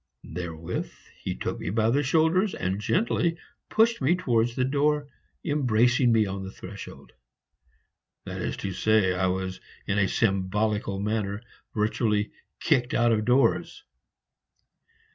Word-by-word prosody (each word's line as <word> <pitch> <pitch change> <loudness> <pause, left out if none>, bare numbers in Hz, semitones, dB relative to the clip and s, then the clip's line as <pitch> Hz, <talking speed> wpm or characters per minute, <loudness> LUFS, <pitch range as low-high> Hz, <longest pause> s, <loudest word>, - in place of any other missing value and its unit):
Therewith 85 0 -4 0.3
he - - -2
took - - -4
me - - -4
by 110 +3 +2
the 140 +4 +3
shoulders 160 +7 +2
and 95 +3 -2
gently 170 - +1 0.3
pushed 230 -2 +3
me 145 +7 +3
towards 120 -9 +1
the 130 - +1
door, 145 +2 +1 0.4
embracing 125 -4 +3
me 110 -2 +4
on 95 0 -4
the 95 - -6
threshold. 100 +1 -10 1.1
That - - -5
is - - -3
to 95 - -2
say, 105 -1 +3
I 95 +1 +1
was 95 0 -3 0.2
in 100 - 0
a 100 - +3
symbolical 100 0 0
manner 105 0 -2 0.3
virtually 105 -1 +1 0.3
kicked 130 -6 +1
out 120 0 +4
of 110 -1 +1
doors. 125 +3 +2
110 Hz, 135 wpm, -26 LUFS, 100-135 Hz, 1.1 s, me